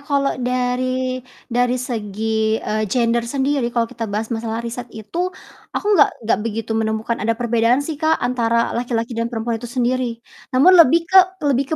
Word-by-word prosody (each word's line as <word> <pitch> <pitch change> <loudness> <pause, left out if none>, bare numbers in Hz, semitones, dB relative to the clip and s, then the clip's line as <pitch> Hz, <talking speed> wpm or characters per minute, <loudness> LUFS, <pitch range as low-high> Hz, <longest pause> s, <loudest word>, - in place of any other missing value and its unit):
kalau 280 -1 0
dari 255 +1 -1 0.3
dari 245 +1 +2
segi, 220 -2 -1
eee, 215 0 -2
gender 235 +1 +1
sendiri 270 -1 0
kalau 235 -1 +1
kita 225 -1 -6
bahas 215 +3 -3
masalah 225 0 -3
riset 240 +1 -5
itu, 335 - -3 0.5
aku - - -3
nggak 300 - +5
nggak 225 - +2
begitu 225 0 -3
menemukan 220 +1 -1
ada 225 +2 0
perbedaan 235 +2 +2
sih 310 -1 -4
Kak, 320 0 +3
antara 235 -2 +1
laki-laki 235 -1 -2
dan 230 +1 -1
perempuan 225 -1 -3
itu 240 - -7
sendiri, 245 -1 -1 0.3
namun 275 +9 +6
lebih 330 +2 +6
ke 380 +2 +6 0.3
lebih 275 -1 +2
240 Hz, 165 wpm, -20 LUFS, 225-255 Hz, 0.5 s, namun